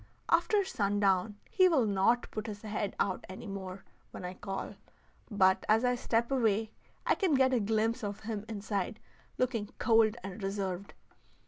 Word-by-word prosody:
After 420 -2 +3
sundown, 200 - +1 0.2
he 370 -2 +5
will 280 -9 +3
not 205 +4 +2
put 215 0 -4
his 210 0 -7
head 210 -1 -3
out 190 -2 0
any 190 +4 -8
more 195 -2 -6 0.3
when 180 - -8
I 180 - -4
call, 195 +1 -5 0.6
but 190 -3 +3
as 220 +3 +4
I 250 - +3
step 235 0 0
away 220 -4 +1 0.3
I - - +4
can 365 -8 +2
get 260 0 +4
a 250 - +3
glimpse 220 +2 0
of 200 -1 -4
him 215 -1 -4
inside 210 0 -3 0.4
looking 235 -5 -1
cold 225 -1 +4
and 195 +2 -7
reserved. 195 -1 -3
210 Hz, 160 wpm, -31 LUFS, 195-230 Hz, 0.6 s, he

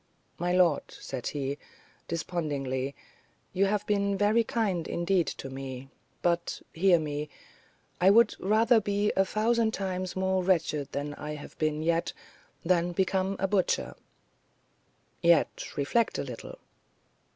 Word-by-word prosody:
"My 175 +1 0
lord," 180 -4 +4
said 130 -3 -6
he, 140 0 -3 0.5
despondingly, 140 -5 -2 0.6
"you 195 +2 +3
have 210 +1 0
been 200 -1 +1
very 210 +3 +3
kind, 205 -7 -1
indeed, 175 0 +1
to - - -5
me; 135 0 -7 0.3
but, 170 -1 0
hear 180 +1 +4
me: 150 -1 -3 0.7
I 185 - +7
would 230 +4 +6
rather 220 +3 +4
be 205 +1 +1
a 195 - +4
thousand 220 +2 +1
times 185 -1 -3
more 190 0 +1
wretched 160 -6 +1
than 145 +1 -3
I 150 +1 -6
have 145 - -10
yet 155 +2 0 0.5
been - - -7
than 175 -1 +2
become 190 +1 0
a 195 - 0
butcher." 195 -2 0 1.3
"Yet 170 -2 +2
reflect 185 +12 +1
a - - -1
little." - - -8
180 Hz, 130 wpm, -29 LUFS, 150-200 Hz, 1.3 s, I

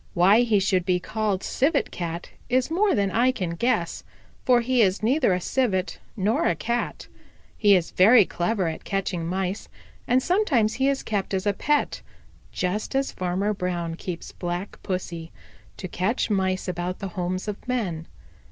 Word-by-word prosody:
Why 190 +5 +6
he 225 -4 +3
should 190 -2 +1
be 180 0 +1
called 210 0 -2
Civet 285 +2 +1
Cat 170 -1 -5 0.2
is 255 +4 +1
more 395 +4 +2
than 200 -2 +1
I 245 +5 +3
can 185 -9 -3
guess, 235 +9 -1 0.4
for 245 -1 +4
he 250 +1 +2
is 195 0 +2
neither 255 0 +3
a 180 - +1
Civet 190 -3 -1 0.2
nor 210 +4 +1
a 170 - +2
Cat. 235 +8 -3 0.5
He 205 -3 +5
is 175 -3 0
very 215 +3 +6
clever 180 +2 -1
at 160 - -5
catching 185 -4 -2
Mice, 190 +3 -3 0.4
and 255 +1 +3
sometimes 290 - +2
he 265 +1 +1
is 275 -1 0
kept 200 -2 -2
as 190 +1 -2
a 205 - +2
pet, 295 +8 0 0.5
just 205 +8 -2
as 270 0 +1
Farmer 185 +3 -1
Brown 175 -3 -3
keeps 170 0 -6
Black 175 +2 -5
Pussy, 170 -3 -4 0.5
to 185 - -5
catch 190 +9 -1
the - - +1
Mice 190 -1 0
about 180 0 -3
the 195 - -5
homes 185 +2 -3
of 210 +4 -6
men. 185 -11 -2
195 Hz, 170 wpm, -25 LUFS, 180-235 Hz, 0.5 s, Why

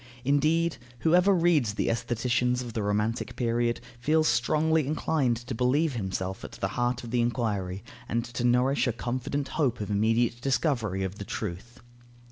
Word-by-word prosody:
Indeed, 155 +4 +2 0.2
whoever 180 +4 +4
reads 165 - +3
the - - -1
aestheticians 120 +2 0
of 120 -2 -7
the 110 - -2
romantic 105 +3 -1
period, 120 -1 0 0.2
feels 155 +5 +2
strongly 155 +4 +2
inclined 145 -5 +1
to 120 +3 -6
believe 130 +6 +2
himself 95 -3 -3
at - - -8
the 95 - -2
heart 125 +3 -1
of 115 - -7
the 120 -1 +2
enquiry 105 -6 -1 0.3
and 115 +1 0
to 120 0 -5
nourish 125 +3 +3
a 120 - +1
confident 130 +4 -3
hope 135 -7 0
of 105 0 -4
immediate 115 +3 +1
discovery 120 - 0
of 95 +1 -5
the - - -4
truth. 110 +6 -6
120 Hz, 160 wpm, -28 LUFS, 115-140 Hz, 0.3 s, whoever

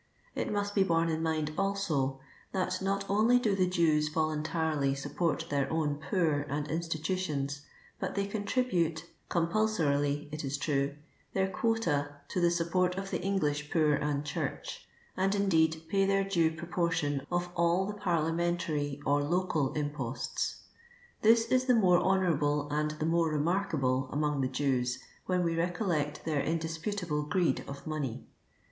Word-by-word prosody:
It - - -2
must 205 0 -1
be 200 - +3
borne 165 -3 +2
in 160 0 -1
mind 155 -2 -1
also, 165 -10 0 0.3
that 185 -1 -1
not 195 +1 0
only 220 +5 +4
do 215 -5 +1
the 185 -1 +2
Jews 155 -4 +2
voluntarily 155 -2 0
support 145 +3 -1
their 140 -1 0
own 155 -3 0
poor 165 -7 +2
and 145 +1 -2
institutions, 155 -3 -2 0.4
but - - -3
they 200 0 0
con 205 +1 -4
tribute— 175 -10 +1 0.3
c»»mpulsorily 160 -6 +1
it 150 - -4
is 140 0 -2
true 140 -1 0 0.2
— - - -36
their 190 0 +2
quota 165 -10 0
to 180 - -1
the 175 - +5
support 180 +2 +1
of 195 0 -4
the - - -1
English 150 -7 0
poor 155 -3 +3
and 145 0 -1
church; 150 - -4 0.3
and, 195 +2 +1
indeed, 160 -5 +2
pay 195 +2 +2
their 195 0 +3
due 175 -5 +2
])roportion 165 -3 -1
of 175 0 -1
all 170 +2 +2
the 205 - -3
parlia 170 -6 0
mentary 165 -4 -1
or 145 +1 +3
local 165 -3 +1
imposts. 145 -4 -3 0.6
This 225 +1 +5
is 255 +1 +3
the 250 -1 +4
more 180 -5 +5
honourable 150 -6 +2
and 150 +1 +1
the 155 0 -3
more 165 0 +2
remarkable 150 -5 0
among 150 -1 0
tlie 130 0 -1
Jews, 130 -3 0 0.3
when 180 -1 +2
we 165 -1 0
recollect 165 -4 -1
their 155 -3 +1
indisputable 165 +1 -2
greed 155 -1 +1
of 140 0 -8
money. 150 -6 -3
165 Hz, 155 wpm, -31 LUFS, 145-185 Hz, 0.6 s, the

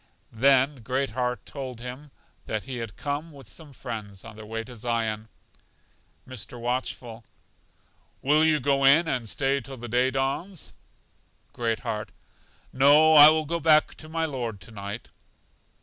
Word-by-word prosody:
Then 135 +4 +4
Great 130 +3 -1
heart 125 -1 -2
told 130 -4 -7
him 125 +5 -8 0.4
that 110 -1 -2
he 130 -2 -6
had 115 -4 -6
come 145 +3 -4
with 140 -5 -14
some 150 - -12
friends 110 -7 -7
on 115 -2 -10
their 110 0 -11
way 115 +1 -4
to 125 +1 -11
Zion. 110 -2 -2 1.0
Mr. 125 -1 -7
Watchful: 120 -1 -3 1.0
Will 150 +3 +4
you 155 -1 +3
go 140 +1 +1
in 150 +5 +6
and 125 -7 -2
stay 135 +2 0
till 135 +2 -9
the 120 0 -7
day 125 +3 +2
dawns? 135 +7 -3 0.8
Great 115 -2 -1
heart: 105 -1 -4 0.6
No, 145 +4 +6
I 150 0 +11
will 155 0 +1
go 170 +3 -2
back 155 -2 +4
to 155 - -10
my 165 0 -1
Lord 120 -8 -4
to 105 - -13
night. 100 +1 -7
130 Hz, 155 wpm, -26 LUFS, 115-145 Hz, 1.0 s, I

